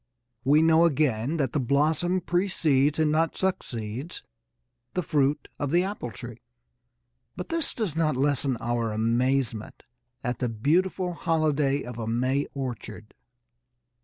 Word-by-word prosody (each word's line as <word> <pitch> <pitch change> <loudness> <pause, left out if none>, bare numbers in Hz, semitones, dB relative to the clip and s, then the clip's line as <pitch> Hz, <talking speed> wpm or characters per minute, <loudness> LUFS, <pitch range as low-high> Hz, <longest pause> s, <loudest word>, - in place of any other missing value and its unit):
We 150 +4 +5
know, 165 +1 +5
again, 145 -2 +1
that 135 -5 0
the 150 - +1
blossom 155 +7 +1
precedes 160 -6 +1
and 155 -1 +2
not 160 +1 +1
succeeds 130 - -3 0.7
the 180 - 0
fruit 145 -1 +1
of 145 - -1
the 175 +4 +3
apple 195 -10 -4
tree, 120 +2 -9 1.0
but 180 - -6
this 330 -2 +2
does 210 -10 -3
not 155 -3 +1
lessen 140 -2 +1
our 115 -1 -1
amazement 115 +1 0 0.4
at 125 -1 -2
the 125 - 0
beautiful 175 - +1
holiday 150 -4 +1
of 120 -1 -7
a 110 - -4
May 130 +5 0
orchard. 120 -5 -6
145 Hz, 135 wpm, -26 LUFS, 120-165 Hz, 1.0 s, We